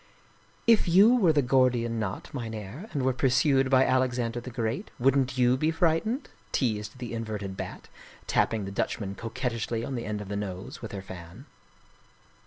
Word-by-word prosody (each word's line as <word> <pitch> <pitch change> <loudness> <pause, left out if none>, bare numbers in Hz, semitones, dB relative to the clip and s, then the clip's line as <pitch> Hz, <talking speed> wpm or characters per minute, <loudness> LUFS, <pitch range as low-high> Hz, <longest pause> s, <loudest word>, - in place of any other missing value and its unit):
" - - -33 0.2
If 230 -5 +5
you 200 +8 +7
were 190 -9 +4
the 145 -2 +2
Gordian 125 -3 +2
knot, 100 -3 -4
Mynherr, 115 - -6
and 140 -4 -1
were 130 0 +2
pur 130 +1 +2
sued 135 0 +3
by 130 0 +5
Alexander 125 -2 +1
the 120 - -8
Great, 120 - -3
wouldn't 135 0 +2
you 125 0 +4
be 155 +4 +1
frightened? 175 - +1
" - - -33
teased 110 -3 -1
the 120 -2 -6
inverted 105 -4 -4
Bat, - - -7 0.4
tapping 110 -3 +1
the 95 - -5
Dutchman 100 0 -2
coquettishly 115 0 -3
on 135 - -4
the 120 -2 -3
end 105 0 -3
of 105 - -7
the 100 - -4
nose 100 +5 -5
with 115 - -6
her 100 -1 -6
fan. 95 - -10
125 Hz, 185 wpm, -28 LUFS, 110-135 Hz, 0.4 s, you